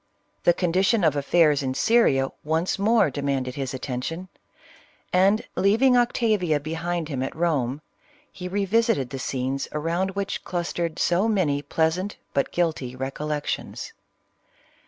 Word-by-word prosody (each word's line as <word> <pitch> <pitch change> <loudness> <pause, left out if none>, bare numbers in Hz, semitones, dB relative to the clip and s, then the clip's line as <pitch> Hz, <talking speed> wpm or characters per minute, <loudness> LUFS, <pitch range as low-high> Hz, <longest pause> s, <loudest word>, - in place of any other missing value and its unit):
The 175 - +6
condition 190 +4 +2
of 155 -3 +3
affairs 150 0 +3
in 130 -1 -2
Syria 135 - +3
once 160 +5 0
more 215 -6 +3
demanded 135 -2 -2
his 135 -1 -4
attention, 135 +7 -4 0.8
and 195 +4 +4
leaving 230 +6 +4
Octavia 215 -9 +2
bchiml 165 +2 -3
him 135 -4 -3
at 130 - -3
Home, 150 -5 0 0.5
he 180 - -7
re 200 +2 -1
visited 210 - +1
the 135 - -5
scenes 130 +1 -2
around 170 +5 -1
which 200 0 -3
clustered 170 -2 -3
so 180 +5 +2
many 170 -10 +1
pleasant 160 +7 -1 0.2
but 140 - 0
guilty 155 -8 -1
recollections. 145 +3 -4
165 Hz, 130 wpm, -24 LUFS, 140-190 Hz, 0.8 s, The